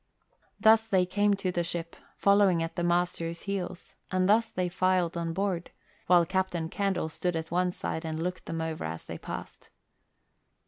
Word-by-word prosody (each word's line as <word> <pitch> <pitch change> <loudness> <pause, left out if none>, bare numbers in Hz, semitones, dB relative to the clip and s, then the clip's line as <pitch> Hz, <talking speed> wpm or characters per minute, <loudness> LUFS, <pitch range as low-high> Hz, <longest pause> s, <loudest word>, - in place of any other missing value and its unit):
Thus 220 0 +5
they 190 -4 +3
came 205 +2 +2
to 195 -2 -2
the 175 -1 0
ship, 170 0 -5 0.2
following 200 -4 +4
at 165 - -5
the 175 - -1
master's 175 -1 0
heels, 185 -3 -4 0.2
and 185 -1 +1
thus 225 +2 +4
they 180 -3 -1
filed 185 -1 +1
on 170 -1 -2
board, 185 -1 -1 0.4
while 175 -1 +6
Captain 180 -2 -1
Candle 195 -4 0
stood 175 +2 -2
at 160 0 -4
one 180 +1 +2
side 165 -2 -4
and 160 -1 -3
looked 180 +2 -4
them 165 0 -3
over 160 -1 -3
as 80 +1 -5
they - - -7
passed. - - -8
180 Hz, 175 wpm, -29 LUFS, 165-190 Hz, 0.4 s, while